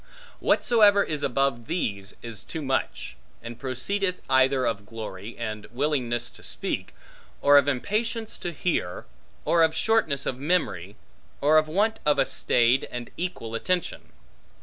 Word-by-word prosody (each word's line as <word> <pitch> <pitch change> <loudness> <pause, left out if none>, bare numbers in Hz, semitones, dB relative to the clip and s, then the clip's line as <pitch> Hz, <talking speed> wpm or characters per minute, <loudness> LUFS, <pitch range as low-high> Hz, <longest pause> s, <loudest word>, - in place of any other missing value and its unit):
Whatsoever 205 -4 +4
is 150 -2 -3
above 135 -3 0
these 100 - -2
is 115 -3 -6
too 160 - -6
much; 130 - -2 0.3
and 115 0 -8
proceedeth 180 +9 -2
either 130 0 +4
of 105 -3 -1
glory, 110 -1 -7
and 110 -2 -5
willingness 120 -3 -1
to - - -15
speak, - - -4 0.4
or 145 0 +5
of 145 -1 +6
impatience 215 - -1
to 175 - -3
hear, 155 - -2 0.4
or 170 - +3
of 160 0 +4
shortness 160 -11 +1
of 125 - -2
memory, 135 - -1 0.4
or 155 +2 +5
of 155 - -2
want 210 +7 +1
of 150 -1 +3
a - - +4
staid 125 +2 +2
and 120 -1 -6
equal 170 -11 -4
attention. 180 +10 -2
140 Hz, 145 wpm, -26 LUFS, 120-175 Hz, 0.4 s, of